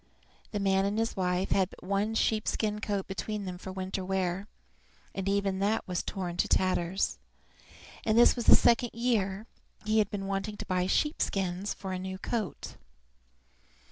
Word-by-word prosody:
The 205 - -3
man 195 -1 +2
and 200 +2 -1
his 225 0 0
wife 180 -1 0
had 190 -2 +3
but - - -15
one 200 +4 0
sheepskin 215 -1 0
coat 200 -2 -1
between 205 +1 -4
them 180 -1 -5
for 190 - -7
winter 190 0 -3
wear, 190 +1 -1 0.7
and 195 0 -2
even 200 -1 +1
that 205 +3 0
was 180 -1 -1
torn 180 -3 -4
to - - +2
tatters, 185 0 +1 0.8
and 220 0 +2
this 240 - +7
was 240 -2 -4
the - - +11
second 240 0 +3
year 220 -4 0 0.4
he 215 +1 +3
had 210 -2 +2
been 195 -1 -4
wanting 195 +2 -3
to - - -6
buy 180 0 0
sheep 300 +9 +1
skins 190 0 -1
for 190 -1 -6
a 185 - -3
new 190 0 -5
coat. 215 0 -4
195 Hz, 170 wpm, -30 LUFS, 185-215 Hz, 0.8 s, the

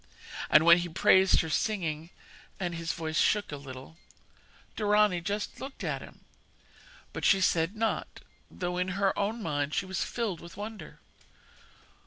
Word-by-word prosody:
And 155 +2 +6
when 170 +1 +8
he 175 0 -3
praised 190 +2 +4
her 160 - -5
singing 165 -7 -1 0.5
and 175 -2 -2
his 165 0 -3
voice 160 -2 -2
shook 210 -5 +2
a - - -3
little 140 +2 -10 0.8
Dorani 210 -4 +3
just 205 +4 -4
looked 270 +1 -7
at - - -2
him; - - -13 0.9
but - - -6
she 195 - +5
said 175 0 +1
naught, 225 0 -2 0.3
though, 180 -1 -4
in 180 - 0
her 200 -1 +2
own 215 +3 -2
mind, 145 -2 -1
she - - 0
was 185 -1 -2
filled 215 -8 -3
with 170 +1 -12
wonder. 215 +1 -8
180 Hz, 155 wpm, -29 LUFS, 165-205 Hz, 0.9 s, when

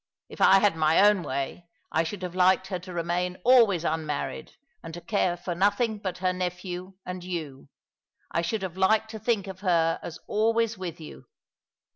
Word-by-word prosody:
If - - -10
I 195 - +7
had 200 -2 +3
my 155 0 +3
own 205 -1 +5
way, 140 +3 -4 0.2
I 160 - +2
should 180 +4 -5
have 180 -1 -4
liked 185 +1 +3
her 185 -3 -3
to 185 +1 -10
remain 175 +1 -2
always 230 -9 +5
unmarried, 155 -2 -3 0.3
and 165 0 -8
to - - -6
care 185 -4 0
for 175 0 -4
nothing 205 +4 +1
but 190 -3 -4
her 185 0 0
nephew 180 +1 -5
and 180 0 -6
you. 155 -7 -6 0.6
I 170 - 0
should 190 +5 -2
have 185 -1 -5
liked 220 +3 +2
to 220 - -7
think 215 -2 0
of 190 -2 -8
her 170 -4 +2
as 175 - -7
always 225 +1 +1
with 180 -4 -6
you." 150 -5 -11
180 Hz, 185 wpm, -27 LUFS, 170-200 Hz, 0.6 s, I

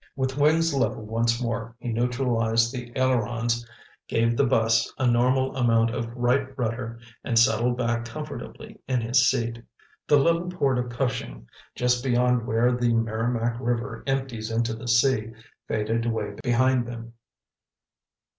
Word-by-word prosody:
With 130 -1 -2
wings 160 +3 +3
level 130 -5 -1
once 115 +2 0
more, 115 -1 -3
he 120 - -6
neutralized 115 -1 +1
the 125 -2 -6
ailerons, 120 -2 0 0.4
gave 115 +1 +1
the 140 +2 +2
bus 115 -2 +2
a 130 - 0
normal 125 +2 +2
amount 115 -2 +2
of 115 -1 -3
right 130 +2 0
rudder 115 -1 -3 0.2
and 115 - 0
settled 115 +1 +3
back 120 -1 -1
comfortably 155 - -8
in 130 -2 0
his 120 +3 +3
seat. 115 -2 -2 0.5
The 145 - +5
little 170 +4 +2
port 140 -8 0
of 125 0 -3
Cushing, 120 - -3 0.3
just 125 0 +1
beyond 125 -2 +2
where 115 +3 +2
the 120 -1 +1
Merrimac 115 +1 -1
River 115 -2 -3
empties 130 -5 -2
into 115 0 0
the 115 +2 -8
sea, 115 -2 +2 0.3
faded 115 +2 -1
away 115 -1 -2
behind 125 0 +2
them. 115 -1 -8
120 Hz, 145 wpm, -25 LUFS, 115-130 Hz, 0.5 s, The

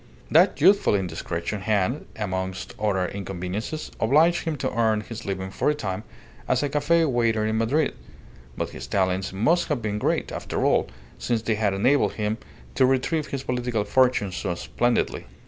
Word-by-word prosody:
That - - +5
youthful 200 - +5
indiscretion 85 +1 -3
had, 110 +7 0
amongst 95 -3 -4
other 100 -4 +1
inconveniences, 100 - -5
obliged 155 +9 +3
him 160 -2 -1
to - - -2
earn 110 -2 +2
his 115 +2 -8
living 95 -1 -3
for - - 0
a 150 - +1
time 95 -6 -4 0.4
as - - +2
a 145 - 0
cafe 160 +3 +2
waiter 115 -5 +1
in 110 +1 0
Madrid; 135 +7 +1 0.6
but - - -3
his - - -8
talents 95 0 0
must 120 - +2
have 150 -5 0
been 105 -1 -1
great, - - 0
after - - -2
all, - - +3 0.3
since 115 -2 -1
they 115 - +1
had 105 -2 0
enabled 135 +9 +3
him 105 +1 -2 0.3
to 130 - +4
retrieve 145 +4 +1
his 135 -1 -4
political 125 -4 -1
fortunes 105 -4 +2
so 90 -4 -2
splendidly. 120 +6 -1
110 Hz, 165 wpm, -25 LUFS, 95-130 Hz, 0.6 s, That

